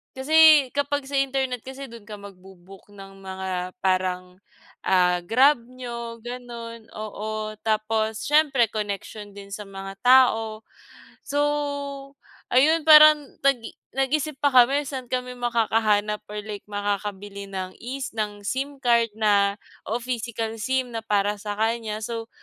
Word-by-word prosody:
Kasi 305 0 +6
kapag 285 0 -1
sa 280 0 -2
internet 265 -2 -1
kasi 265 +1 -8
do'n 230 -2 -12
ka 210 - -7
magbo-book 190 -1 -14
ng 195 -1 -12
mga 190 -1 -5
parang, 185 -1 -1 0.5
ah, 180 -1 +3
Grab 255 +7 +4
niyo 235 -2 -7
gano'n 235 -2 -8
oo, 215 0 -5
tapos 220 0 -1
siyempre 280 -6 +3
koneksiyon 205 0 -5
din 200 0 -11
sa 205 0 -7
mga 195 0 -9
tao. 225 -4 +4 0.7
So, 290 0 -1 1.1
ayun 305 +5 +4
parang 305 -2 +7
nag-i 260 -5 +1 0.2
nag-isip 275 +2 -1
pa 290 - +4
kami 265 +4 +5
saan 260 -3 -6
kami 250 0 -3
makakahanap 220 -3 +1
or 210 0 -5
like 210 -2 -7
makakabili 205 -1 -4
ng 185 -1 -5
es 260 +2 -5
ng 210 -2 -4
SIM 275 +5 -3
card 235 -3 +3
na 200 -2 +3 0.3
oo, 230 +3 -1
physical 230 -2 -4
SIM 260 +1 -1
na 225 - -3
para 205 -1 +1
sa 205 0 -6
kanya. 220 -1 -1
So, 225 +1 -5
225 Hz, 135 wpm, -24 LUFS, 205-255 Hz, 1.1 s, parang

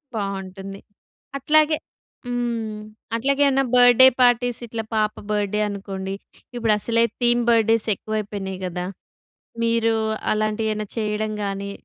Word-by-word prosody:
బాగుంటుంది. 195 -1 -5 0.6
అట్లాగే 310 +2 +3 0.5
హ్మ్. 235 -3 -2 0.4
అట్లాగే 275 +4 0
ఏమైనా 270 0 +2
బర్త్‌‌డే 245 +1 +8
పార్టీస్ 245 -1 +3
ఇట్లా 225 0 -4
పాప 215 -1 +1 0.2
బర్త్‌‌డే 210 0 0
అనుకోండి. 195 -1 -5 0.4
ఇప్పుడు 225 -3 +2
అసలే 230 +2 +1 0.2
థీమ్ 240 0 +3
బర్త్‌‌డేస్ 225 -1 +3
ఎక్కువైపోయినాయి 200 -3 -4
కదా! 180 0 -4 0.8
మీరు 230 0 +2 0.4
అలాంటి 215 +1 -1
ఏమన్నా 215 0 -4
చేయడం 215 0 -1
గాని? 200 0 -4
220 Hz, 110 wpm, -22 LUFS, 200-240 Hz, 0.8 s, బర్త్‌‌డే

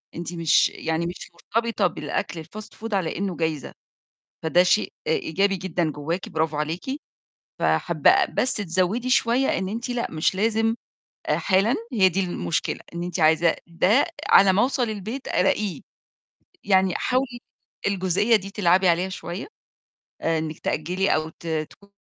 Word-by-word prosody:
أنتِ 170 +1 -5
مش 165 -1 +3
يعني 160 +1 -2
مش 175 0 -7
مرتبطة 220 +3 0
بالأكل 160 0 -4
الfast 215 +5 -11
food 225 -1 -5
على 185 -5 -1
إنه 195 -2 -2
جايزة، 160 -4 -2 0.7
فده 175 +3 +4
شيء 210 +4 +2
إيجابي 195 +5 +1
جدًا 175 -3 -1
جوّاكِ 155 +5 -4
برافو 160 -1 -1
عليكِ. 155 +4 -2 0.8
فحابّة - - +3
بس 255 - 0
تزوّدي 200 +6 -1
شوية 250 +1 +3
إن 190 0 -2
أنتِ 235 +4 -4
لأ، 245 -1 -2
مش 160 +3 +1
لازم 225 +2 +1 0.5
آآ - - +2
حالًا. 200 +5 +2 0.2
هي 195 -5 +5
دي 185 +2 -1
المشكلة، 85 - -2
إن 170 - -3
أنتِ 175 0 -3
عايزة 160 +1 +4
ده 185 +10 +3 0.2
على 195 -1 +7
ما 195 - +3
أوصل 260 0 +1
البيت 215 +6 -5
ألاقيه، 190 +1 +1 0.8
يعني 190 -2 +3
حاولي 250 -1 -1 0.5
الجزئية 195 +3 +2
دي 195 -2 -1
تلعبي 185 -2 +3
عليها 175 +3 +1
شوية، 185 +2 -6 0.7
آآ، 165 0 +1
إنِّك 155 0 -4
تأجّلي 180 +6 0
أو 155 0 -1
ت 165 - -14
تكو 160 +5 -4
185 Hz, 145 wpm, -24 LUFS, 165-210 Hz, 0.8 s, على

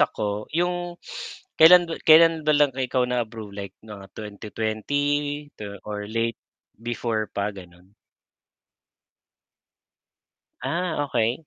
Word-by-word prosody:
ako, 105 0 0
'yung 175 0 -1 0.6
kailan-kailan 165 -1 +6
ba 150 - +5
lang 145 -2 +4
ikaw 130 -1 +1
na-approve? 115 -4 -3
Like 100 -1 -7
mga 105 -3 -10
2020. 145 +8 -2 0.3
Or 105 -1 -5
late 115 +1 -1 0.4
before 115 -1 -2
pa, 100 +1 -1
gano'n? 90 -1 -14 2.7
Ah, 170 -3 -1
okay. 120 +4 -1
120 Hz, 90 wpm, -24 LUFS, 105-150 Hz, 2.7 s, kailan-kailan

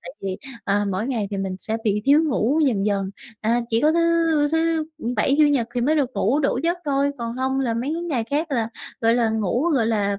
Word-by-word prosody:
tại - - -8
vì, 190 -1 -3 0.3
à, 205 0 +1
mỗi 195 +5 -2
ngày 225 -7 -2
thì 200 - -3
mình 190 -1 -3
sẽ 220 +3 -3
bị 210 -1 +1
thiếu 285 +3 +5
ngủ 280 +1 +1
dần 210 -6 +1
dần, 195 -2 0 0.3
à, 230 +2 +1
chỉ 225 0 +2
có 305 +3 +4
thứ 335 - +2 0.5
thứ 325 -1 +1 0.3
Bảy, 270 +6 +2
Chủ 305 - +7
Nhật 255 -6 +1
thì 245 - 0
mới 285 +6 +2
được 280 -5 +1
ngủ 265 +9 +1
đủ 275 -3 +1
giấc 345 +1 0
thôi, 280 0 +1
còn 235 0 -4
hông 265 +1 0
là 235 -4 0
mấy 250 +6 -2
cái 340 - -4
ngày 270 -10 -1
khác 305 +3 -1
là, 230 -5 0 0.3
gọi 230 0 +3
là, 235 -2 +2
ngủ, 220 +3 0
gọi 255 -8 +2
là, 205 -3 0
240 Hz, 240 wpm, -22 LUFS, 215-285 Hz, 0.5 s, Chủ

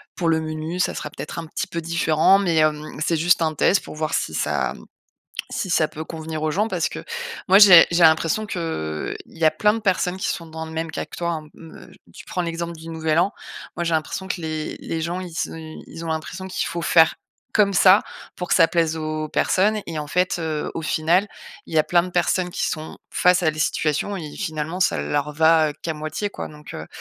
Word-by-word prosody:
pour 170 -2 0
le 160 - +3
menu, 155 +3 -4
ça - - +1
sera - - -5
peut-être - - -6
un 165 - -7
petit - - -3
peu 170 - -4
différent 165 +2 +3
mais 175 -5 +1
hem, 155 -1 0
c'est 165 - +1
juste 175 +2 +3
un 155 -1 0
test 195 - +3
pour - - -9
voir 155 0 -2
si 80 - -2
ça 75 -3 0 0.8
si 190 - -3
ça 160 -3 +3
peut 155 - -7
convenir 160 -1 -6
aux 155 - +1
gens» 210 +7 +1
parce - - 0
que - - -8 0.4
moi, 195 - +8
j'ai 185 -5 +10
j'ai 170 - +3
l'impression 160 +6 +4
qu'il 160 - -3
y 165 - -4
a 155 - +7
plein 210 +7 +3
de 225 - -3
personnes 185 -3 0
qui - - -2
sont 170 - -3
dans 160 0 -7
le 160 - -9
même 160 0 -3
cas 155 - -4
que - - -11
toi 170 0 -1
hein. 155 -2 -6
Me 165 -1 -13
j - - -19 0.2
tu - - -11
prends 180 - -2
l'exemple 170 0 -3
du 160 +1 -11
Nouvel 160 0 0
An, 190 +3 +1 0.4
moi 175 - -1
j'ai 165 -1 0
l'impression 160 +4 -2
que 185 - -3
les 155 -1 -4
les 165 - -4
gens, 175 +3 -2
ils 180 -2 -7
se - - -2 0.4
ils 165 - -8
ont - - -5
l'impression 170 +4 -4
qu'il - - -2
faut 170 0 -4
faire 165 -1 +5 0.4
comme 200 -2 +3
ça 185 +3 +6 0.3
pour 180 - -5
que - - +3
ça 165 - +6
plaise 165 -2 +1
aux 155 -1 -3
personnes 210 +7 +2
et 160 -2 -4
en 150 - -4
fait, 180 +3 +1
heu, 155 -2 -2
au - - -3
final, 170 +6 +2 0.4
il - - -9
y - - +5
a - - +6
plein 175 -1 +3
de - - -6
personnes 180 0 +1
qui - - -1
sont 155 0 -5
face 180 0 +3
à 160 - +3
des 155 - -10
situations 155 +6 0
et 155 -5 -7
finalement 160 -1 -4
ça - - +3
leur 145 - -1
va 160 0 +4
qu'à 165 - -2
moitié 155 +7 -4
quoi. - - -6
Donc, 150 0 -12
heu, 80 - -6
165 Hz, 235 wpm, -22 LUFS, 155-180 Hz, 0.8 s, j'ai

